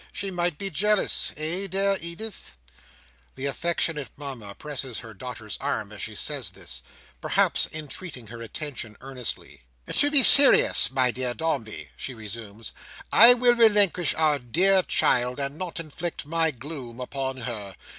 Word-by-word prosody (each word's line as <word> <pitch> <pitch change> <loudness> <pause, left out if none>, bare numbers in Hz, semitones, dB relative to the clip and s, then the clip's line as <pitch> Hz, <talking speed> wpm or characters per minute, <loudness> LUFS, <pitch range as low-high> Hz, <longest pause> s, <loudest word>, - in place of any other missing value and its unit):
She 195 -1 -5
might 175 -3 -1
be 195 +2 -4
jealous. 210 +5 +2
Eh, 170 +6 -1
dear 195 +1 +1
Edith?" 170 - -6 0.8
The 130 - -5
affectionate 155 0 -2
Mama 125 -8 -8
presses 135 -5 -6
her 110 -1 -11
daughter's 110 -1 -7
arm, - - -3
as - - -9
she - - -5
says - - -2
this; - - -6 0.4
perhaps - - +2
entreating 155 -3 -8
her 115 +1 -10
attention 115 -2 -7
earnestly. 130 -2 -6 0.3
"To 290 - +3
be 285 -3 +4
serious, 280 +3 +8
my 130 -1 +1
dear 125 0 -3
Dombey," 110 - -4
she 130 - -7
resumes, 110 0 -9 0.4
"I 235 +3 +8
will 245 0 +4
relinquish 205 -8 +3
our 155 -2 +2
dear 185 +10 +3
child, 125 -6 +1
and 140 0 -3
not 180 -2 -4
inflict 165 +1 -6
my 165 +1 +1
gloom 130 -3 -8
upon 130 +1 -4
her. 105 -5 -5
145 Hz, 145 wpm, -25 LUFS, 120-175 Hz, 0.8 s, serious